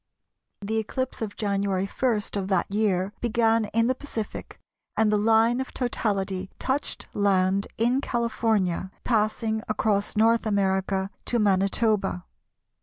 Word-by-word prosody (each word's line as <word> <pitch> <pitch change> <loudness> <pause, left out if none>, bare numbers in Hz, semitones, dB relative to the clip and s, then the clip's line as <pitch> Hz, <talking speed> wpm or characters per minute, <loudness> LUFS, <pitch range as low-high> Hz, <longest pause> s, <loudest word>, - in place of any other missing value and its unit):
The 220 +2 -1
eclipse 260 +4 -3
of 210 -2 -4
January 200 -2 0
1 225 +1 0
of 195 -2 -2
that 195 0 0
year 200 -2 +1
began 230 -1 +2
in 230 +2 +1
the 255 - +2
Pacific 255 -5 -6 0.4
and 220 -1 +3
the 210 - +3
line 225 +3 +3
of 265 - -7
totality 195 -6 -1
touched 270 +2 -2
land 195 -1 +2
in 245 +4 +2
California, 220 -7 0
passing 220 -1 0
across 210 -1 0
North 225 +1 +3
America 190 -1 0
to 240 - +1
Manitoba. 195 -2 +1
215 Hz, 125 wpm, -26 LUFS, 195-230 Hz, 0.4 s, and